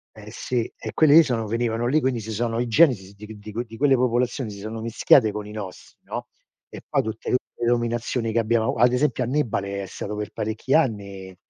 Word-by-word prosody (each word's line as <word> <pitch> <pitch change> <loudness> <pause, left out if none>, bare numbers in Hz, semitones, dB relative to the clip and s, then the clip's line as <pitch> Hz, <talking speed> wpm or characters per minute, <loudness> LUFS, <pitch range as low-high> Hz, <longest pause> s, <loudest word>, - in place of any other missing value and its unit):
Eh 105 0 -11
sì, 120 -1 -2
e - - -7
quelli 155 -2 +5
lì 165 - +9
sono 115 -6 -2
venivano 115 +1 -1
lì, 150 +5 +3
quindi 130 -4 0
si 110 +1 -7
sono 115 +1 -1
i 125 - -1
geni 135 +4 +5
si 95 -1 -12
di 105 +1 -11
qu 110 - -9
di 105 +1 -10
quel 120 +3 -3
di 115 0 -12
quelle 140 -1 +4
popolazioni 125 -1 0
si 100 - -9
sono 110 +2 -6
mischiate 115 0 +4
con 105 0 -6
i - - -9
nostri, 105 -4 -9
no, - - -6 0.4
e - - -10
poi - - +1
tutte 110 0 -5
tutte 125 - +2
le 120 - -3
dominazioni 120 0 0
che 115 - -2
abbiamo 115 0 +1
ad 120 +2 +4
esempio, 130 -1 +1
Annibale 105 -7 -1
è - - -5
stato 105 - -6
per 105 0 -5
parecchi 110 +6 -1
anni 100 - -1
115 Hz, 230 wpm, -24 LUFS, 105-125 Hz, 0.4 s, lì